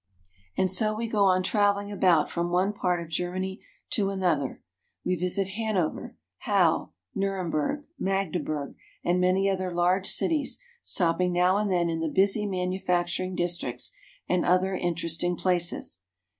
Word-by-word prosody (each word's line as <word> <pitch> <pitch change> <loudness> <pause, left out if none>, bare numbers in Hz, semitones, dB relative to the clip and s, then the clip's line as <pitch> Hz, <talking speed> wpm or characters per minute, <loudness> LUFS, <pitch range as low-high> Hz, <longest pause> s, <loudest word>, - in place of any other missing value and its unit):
And 185 -1 +2
so 215 +3 +1
we 230 +1 -2
go 210 -3 +2
on 185 -1 +3
traveling 205 0 +1
about 180 -6 +3
from 170 0 -2
one 185 +4 +1
part 180 -3 0
of - - -10
Germany 185 +4 -3 0.3
to 200 -4 +1
another. 175 -8 -1 0.4
We 185 - +1
visit 180 +2 0
Hanover, 200 -5 -2 0.2
Halle, - - +2 0.2
Nurem 195 -3 -1
berg, 155 - -1 0.2
Magdeburg, 165 -6 -1 0.3
and 180 +1 +2
many 185 +2 +3
other 185 -2 -1
large 180 +2 +2
cities, 305 -4 0 0.2
stopping 180 +1 +1
now 180 +2 +3
and 210 -1 0
then 175 -2 +2
in 165 -1 -1
the 165 -1 -1
busy 200 +5 +2
manufacturing 180 -1 -1
districts 175 -8 -1 0.4
and 180 -1 +1
other 185 +2 +2
interesting 175 0 0
places. 175 - 0
185 Hz, 145 wpm, -27 LUFS, 175-195 Hz, 0.4 s, on